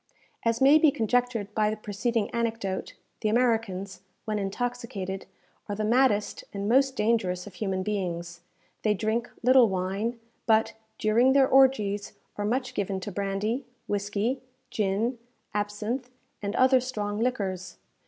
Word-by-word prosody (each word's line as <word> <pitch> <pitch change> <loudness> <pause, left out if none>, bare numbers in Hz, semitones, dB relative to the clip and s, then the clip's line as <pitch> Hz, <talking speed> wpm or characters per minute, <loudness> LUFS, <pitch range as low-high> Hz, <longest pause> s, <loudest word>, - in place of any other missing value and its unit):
As 230 +1 +1
may 280 +3 +7
be 310 - +6
conjectured 240 -4 0
by 210 -1 +2
the 215 - -3
preceding 215 +1 -1
anecdote, 225 -5 -2 0.2
the 215 - 0
Americans, 215 -5 0 0.2
when 215 -1 -1
intoxicated, 200 -2 -4 0.4
are 205 - -1
the 215 - -2
maddest 230 -2 +2
and 200 0 -2
most 265 +3 +3
dangerous 210 -5 +1
of 205 - -10
human 190 -1 -2
beings. 175 -4 -3 0.4
They 210 -1 +2
drink 220 +4 -1
little 250 -2 +6
wine; 195 +5 -2 0.3
but, 220 -1 +3 0.2
during 235 +5 +4
their 270 -1 +5
orgies, 220 -7 +3 0.2
are 205 - -2
much 250 +4 -1
given 195 -1 -2
to 205 - -5
brandy, 200 +6 -1 0.2
whisky, 205 +5 -1 0.3
gin, 215 +4 0 0.3
absinthe, 210 +5 -2 0.3
and 200 +1 -3
other 260 0 +5
strong 210 -5 -3
liquors. 195 -7 -2
215 Hz, 135 wpm, -27 LUFS, 200-245 Hz, 0.4 s, may